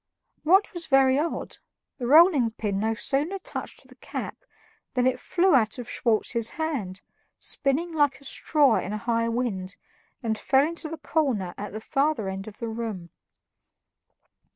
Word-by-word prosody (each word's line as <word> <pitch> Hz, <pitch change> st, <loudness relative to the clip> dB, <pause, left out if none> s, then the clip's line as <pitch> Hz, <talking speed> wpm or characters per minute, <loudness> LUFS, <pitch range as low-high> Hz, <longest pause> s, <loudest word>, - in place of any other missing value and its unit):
What 380 Hz, +6 st, +4 dB
was 345 Hz, -2 st, -6 dB
very 270 Hz, -1 st, +4 dB
odd, 325 Hz, +2 st, -3 dB, 0.4 s
the 245 Hz, -, -2 dB
rolling 300 Hz, -4 st, +6 dB
pin 210 Hz, -3 st, -3 dB
no 220 Hz, +2 st, 0 dB
sooner 295 Hz, -, 0 dB
touched 380 Hz, -, -7 dB
the -, -, -16 dB
cap -, -, -6 dB, 0.6 s
than 250 Hz, -1 st, +2 dB
it 255 Hz, -1 st, +1 dB
flew 370 Hz, +5 st, +2 dB
out 225 Hz, -4 st, +3 dB
of 245 Hz, -2 st, -7 dB
Schwartz's 230 Hz, 0 st, 0 dB
hand, 240 Hz, -, -3 dB, 0.4 s
spinning 310 Hz, +5 st, -1 dB
like 290 Hz, -3 st, +2 dB
a -, -, -18 dB
straw 280 Hz, -2 st, +3 dB
in 205 Hz, -, -3 dB
a -, -, -1 dB
high 230 Hz, -1 st, +1 dB
wind, 205 Hz, -6 st, -1 dB, 0.5 s
and 220 Hz, -2 st, -1 dB
fell 270 Hz, +1 st, +3 dB
into 330 Hz, -1 st, -4 dB
the 325 Hz, -, -6 dB
corner 265 Hz, -, -1 dB
at 205 Hz, -, -6 dB
the 215 Hz, -, -5 dB
further 275 Hz, -2 st, 0 dB
end 195 Hz, +1 st, -6 dB
of 215 Hz, 0 st, -10 dB
the 230 Hz, -, -4 dB
room. 220 Hz, -7 st, -5 dB
250 Hz, 160 wpm, -26 LUFS, 220-300 Hz, 0.6 s, rolling